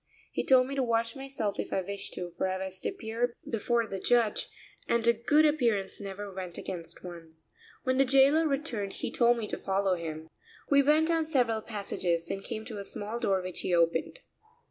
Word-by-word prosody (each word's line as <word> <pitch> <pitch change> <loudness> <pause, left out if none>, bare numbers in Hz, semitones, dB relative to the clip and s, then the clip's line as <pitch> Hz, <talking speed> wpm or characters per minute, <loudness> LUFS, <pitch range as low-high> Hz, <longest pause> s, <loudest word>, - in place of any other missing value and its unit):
He - - -1
told 255 -1 +6
me 270 - -5
to 275 - 0
wash 230 -2 0
myself 270 -7 -3
if - - -3
I 190 - +1
wished 200 +1 -5
to, 175 -1 -5
for - - 0
I 185 0 -1
was 190 0 -8
to - - -2
appear 235 - -2
before 230 +1 +1
the 195 -3 -5
judge, 235 +1 +2 0.4
and 235 -1 +1
a 235 - +7
good 290 +7 +3
appearance 230 -11 +1
never 200 0 -6
went 185 -2 -6
against 170 -3 -7
one. 170 -3 -10 0.5
When 260 0 +1
the - - +7
jailer 275 +4 +5
returned 270 -9 -2
he - - -4
told 240 0 +4
me 220 -2 -3
to - - -4
follow 195 0 +1
him. 160 -2 -5 0.4
We 280 0 +7
went 305 +3 +4
down 325 -2 +1
several 245 -7 +1
passages, 185 -6 -2
then 195 - -4
came 220 +2 -5
to 220 -4 -6
a - - -4
small 210 +4 -5
door 195 -5 +1
which 185 -1 -5
he 180 - +1
opened. 170 - +1
220 Hz, 205 wpm, -29 LUFS, 190-260 Hz, 0.5 s, a